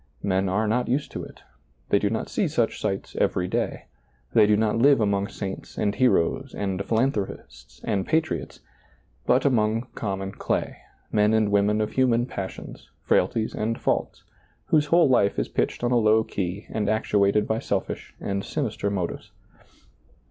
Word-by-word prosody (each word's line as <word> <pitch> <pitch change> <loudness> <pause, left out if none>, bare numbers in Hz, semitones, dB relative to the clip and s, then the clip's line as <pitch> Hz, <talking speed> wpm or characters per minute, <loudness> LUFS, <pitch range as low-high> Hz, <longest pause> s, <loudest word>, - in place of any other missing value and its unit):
Men 95 -1 +1
are 105 +4 +1
not 120 +3 +1
used 135 +4 -1
to - - -5
it, - - -13 0.5
they 100 - +4
do 100 - +1
not 110 +1 -2
see 195 - 0
such 120 -7 -1
sights 95 -2 -3
every 90 - +1
day, - - -2 0.5
they 110 -3 +6
do 105 0 +4
not 110 +1 +1
live 140 +2 +5
among 100 -2 +1
saints 100 -3 -7
and 100 -1 +1
heroes, 125 +2 +1
and 95 -1 -2
philanthropists, 105 - -3
and 100 -4 0
patriots, 160 0 -1 0.7
but 125 +3 +3
among 115 -3 +2
common 95 -2 -3
clay, - - -2 0.3
men 105 +1 +3
and 110 -2 +2
women 105 +1 +2
of 105 - -1
human 120 -2 +2
passions, 95 -6 -7
frailties 110 -1 +1
and 115 +2 -2
faults, - - -1 0.5
whose 150 -2 +3
w^ole 170 +1 +5
life 110 -6 +3
is - - -1
pitched - - -1
on 120 - +1
a 125 - +4
low 110 0 +4
key 95 -1 -4
and 105 -2 -1
actuated 105 -1 +2
by 110 0 0
selfish - - -3
and 100 0 -3
sinister 110 -8 -2
motives. 95 -4 -3
105 Hz, 165 wpm, -25 LUFS, 100-120 Hz, 0.7 s, they